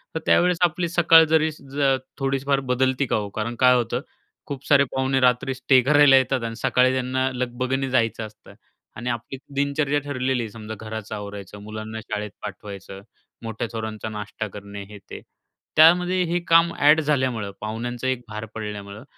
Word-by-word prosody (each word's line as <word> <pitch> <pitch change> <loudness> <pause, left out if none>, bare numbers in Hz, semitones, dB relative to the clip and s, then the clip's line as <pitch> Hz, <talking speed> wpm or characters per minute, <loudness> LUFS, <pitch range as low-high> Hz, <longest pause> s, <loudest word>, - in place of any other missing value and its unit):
तर - - 0
त्यावेळेस 180 0 +3
आपली 175 +1 -1
सकाळ 165 -1 +6
जरी 160 0 +4
ज 140 -2 0 0.2
थोडीफार 135 0 0
जर 135 - -8
बदलती 130 +2 +1
का - - 0
हो? 105 -2 -2
कारण 115 +2 -3
काय 125 -1 +6
होतं 120 0 -1 0.5
खूप 140 -2 -6
सारे 140 -2 +6
पाहुणे 130 0 +1
रात्री 125 +1 +2
स्टे 130 0 +3
करायला 145 +1 +6
येतात 130 -1 +1
आणि 115 0 -4
सकाळी 125 +2 +2
त्यांना 130 +1 0
लगबगने 125 +2 -2
जायचं 115 -3 0
असतं 110 0 -15 0.4
आणि 120 +2 -4
आपली 120 +3 -4 0.2
दिनचर्या 140 +1 +1
ठरलेली 130 -3 -2
आहे, 110 - -6
समजा 110 0 -8
घराचं 110 -1 -6
आवरायचं, 100 -1 -8
मुलांना 110 +1 -7
शाळेत 105 -1 -5
पाठवायचं, 100 -1 -8 0.4
मोठ्या 115 +1 -4
थोरांचा 110 -1 -5
नाष्टा 105 0 -5
करणे, 100 0 -9
हे, 105 - -10
ते. - - -8 0.5
त्यामध्ये 180 +3 +5
हे 175 - +1
काम 165 0 +5
ॲड 150 +2 +6
झाल्यामुळं 130 -8 -1
पाहुण्यांचा 120 +3 -4
एक 130 -1 -1
भार 110 0 -6
पडल्यामुळं, 105 0 -7
125 Hz, 165 wpm, -23 LUFS, 110-140 Hz, 0.5 s, सकाळ